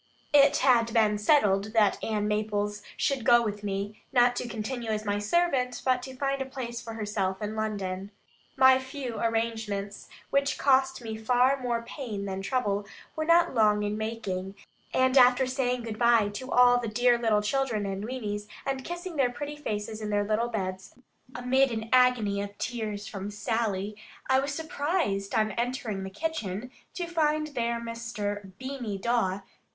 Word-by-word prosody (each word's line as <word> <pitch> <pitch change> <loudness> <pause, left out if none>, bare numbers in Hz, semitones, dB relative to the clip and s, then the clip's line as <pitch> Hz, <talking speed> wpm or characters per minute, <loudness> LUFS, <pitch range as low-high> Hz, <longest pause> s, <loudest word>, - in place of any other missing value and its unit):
It 285 -1 +6
had 235 -3 +4
been 210 -2 +3
settled 210 -4 +3
that 215 -3 +3
Ann 210 -2 -1
Maples 210 -1 -1 0.2
should 275 -4 0
go 240 +1 +6
with 210 -2 -3
me, 200 +1 -4
not 245 -2 +4
to - - -3
continue 235 +1 -4
as 215 0 -2
my 205 0 0
servant, 250 +1 +1
but 255 -1 +2
to 265 0 -8
find 275 +1 -1
a - - -1
place 245 -3 -5
for 230 - -7
herself 205 -3 -2
in 210 +1 -4
London. 200 -3 -3 0.5
My 260 0 +7
few 260 -3 -6
arrangements, 220 -3 -2 0.2
which 280 0 +1
cost 265 -2 +2
me 220 -1 -5
far 250 +4 +3
more 235 -2 -1
pain 230 -6 -5
than 190 -1 -4
trouble, 205 -3 -1 0.3
were 315 - -2
not 340 0 +4
long 210 -3 +3
in 205 0 -1
making; 205 -4 -4 0.4
and 260 +1 +4
after 250 +1 +6
saying 250 -1 -1
good 220 -2 -6
bye 235 -3 +4
to 255 +6 -7
all 245 0 +6
the 240 - -3
dear 240 +2 +3
little 215 -3 +2
children 225 -2 0
and 195 0 -3
weanies, 210 -4 -4 0.2
and 270 -1 -2
kissing 345 0 -6
their 265 -3 +3
pretty 290 +4 -6
faces 215 -6 -4
in 210 - -3
their 205 0 +1
little 215 +3 0
beds, 190 -4 -4 0.4
amid 260 +1 +2
an 220 0 -4
agony 245 -6 +4
of 200 0 -7
tears 215 -4 -4
from 200 0 -6
Sally, 210 -1 -2 0.3
I 260 0 +4
was 280 +1 -2
surprised, 290 - -1
on 215 -1 +2
entering 235 -3 -2
the 190 - -5
kitchen, 225 - -4 0.2
to 355 - -2
find 310 -2 0
there 235 -4 -1
Mr. 215 -4 -5
Beany 260 -5 -4
Dawe. 200 -3 0
230 Hz, 170 wpm, -28 LUFS, 205-260 Hz, 0.5 s, My